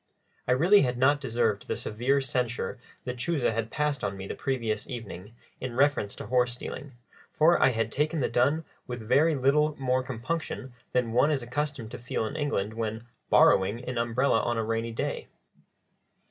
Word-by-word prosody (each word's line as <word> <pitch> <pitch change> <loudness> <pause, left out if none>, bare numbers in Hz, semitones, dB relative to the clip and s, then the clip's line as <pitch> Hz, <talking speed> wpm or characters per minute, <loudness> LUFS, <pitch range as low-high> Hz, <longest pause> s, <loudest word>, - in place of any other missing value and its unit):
I 125 - +4
really 180 +10 +5
had 125 -2 0
not 145 +3 +3
deserved 115 -5 0
the - - -1
severe 125 +6 0
censure 125 -4 -2 0.3
Lechuza 125 +3 0
had 115 0 -2
passed 150 -1 -1
on 100 - -2
me 95 - -6
the - - -4
previous 115 -6 -2
evening 105 -3 -7 0.2
in 125 -2 -5
reference 135 -6 +2
to - - -8
horse 125 +2 +2
stealing, 130 +3 -7 0.4
for 165 +3 +4
I - - +6
had 115 -2 -1
taken 155 +3 0
the 130 - +1
dun 155 +6 +1 0.2
with 120 -3 -6
very 150 +6 +4
little 145 +3 +2
more 130 -1 +1
compunction 130 +1 -4 0.2
than 125 -2 +1
one 125 +5 +4
is 140 -5 0
accustomed 125 -2 -3
to - - -7
feel 120 -2 -2
in 110 - -5
England 110 -9 -1
when 110 0 -3 0.3
"borrowing" 105 +6 +4
an 125 -2 -2
umbrella 120 +1 +2
on 120 0 -1
a 115 - 0
rainy 115 +1 -2
day. 115 - -3
125 Hz, 175 wpm, -28 LUFS, 115-140 Hz, 0.4 s, I